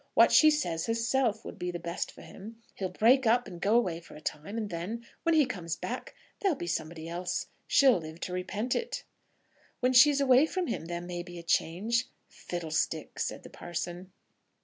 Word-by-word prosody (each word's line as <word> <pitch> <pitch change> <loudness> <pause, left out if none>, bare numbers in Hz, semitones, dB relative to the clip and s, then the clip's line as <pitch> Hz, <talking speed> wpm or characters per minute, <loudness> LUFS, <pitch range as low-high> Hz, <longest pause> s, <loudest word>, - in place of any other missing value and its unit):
"What - - +7
she 310 - +8
says 175 - 0
herself 230 0 +1
would - - -8
be 180 0 -2
the 175 - -3
best 170 +1 -4
for - - -14
him. 225 +3 -11
He'll 190 -2 -3
break 235 +7 +4
up 240 +1 +3
and 175 -3 -9
go 210 +3 +3
away 180 -8 0
for 165 - -14
a - - -9
time, 155 +8 -5
and 215 -3 -3
then, 200 +8 -4 0.2
when 335 -1 +2
he 305 -2 +5
comes 175 -9 -4
back, - - -6 0.2
there'll 380 -8 +1
be - - -4
somebody 165 -1 -3
else. 175 +1 -3 0.2
She'll 265 -8 +5
live 160 0 -9
to 180 - -4
repent 200 +6 -2
it." 480 +1 -3 0.8
"When 250 0 +2
she's 285 +3 +7
away 270 +2 +5
from 370 +2 -2
him 230 - -3
there 170 +1 -4
may 175 0 -5
be 175 0 -10
a 170 - -8
change." 200 +8 +1 0.2
"Fiddlestick!" 165 -3 -3
said - - -3
the - - -12
parson. 175 +2 -5
190 Hz, 195 wpm, -30 LUFS, 170-245 Hz, 0.8 s, she